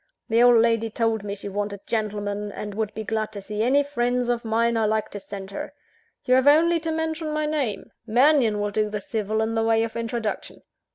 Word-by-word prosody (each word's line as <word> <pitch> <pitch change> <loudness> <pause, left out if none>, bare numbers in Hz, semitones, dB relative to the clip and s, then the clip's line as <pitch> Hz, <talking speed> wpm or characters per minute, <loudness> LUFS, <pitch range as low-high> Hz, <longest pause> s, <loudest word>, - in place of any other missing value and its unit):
The 230 +1 +3
old 245 -1 +7
lady 230 0 +2
told 225 -1 0
me 200 -1 -4
she 200 - -8
wanted 200 0 -4
gentlemen; 210 -2 -2
and 205 +1 -6
would 215 0 -2
be 220 - -4
glad 215 0 -2
to 205 - -5
see 210 +1 -4
any 270 +5 +3
friends 245 -3 -1
of 240 -1 0
mine 230 +1 +1
I 225 -1 +2
liked 215 0 0
to 205 - -6
send 195 0 -8
her. - - -6 0.5
You 255 - +3
have 260 +2 +4
only 330 +3 +5
to 325 0 -3
mention 320 0 -2
my 305 0 -1
name: 285 -9 -2 0.2
Mannion 245 -2 +4
will 205 0 -1
do 215 +1 0
the 210 0 -3
civil 215 +1 -2
in 225 +1 -2
the 225 - +1
way 225 0 +3
of 230 - -5
introduction. 230 -1 -4
225 Hz, 220 wpm, -24 LUFS, 210-245 Hz, 0.5 s, old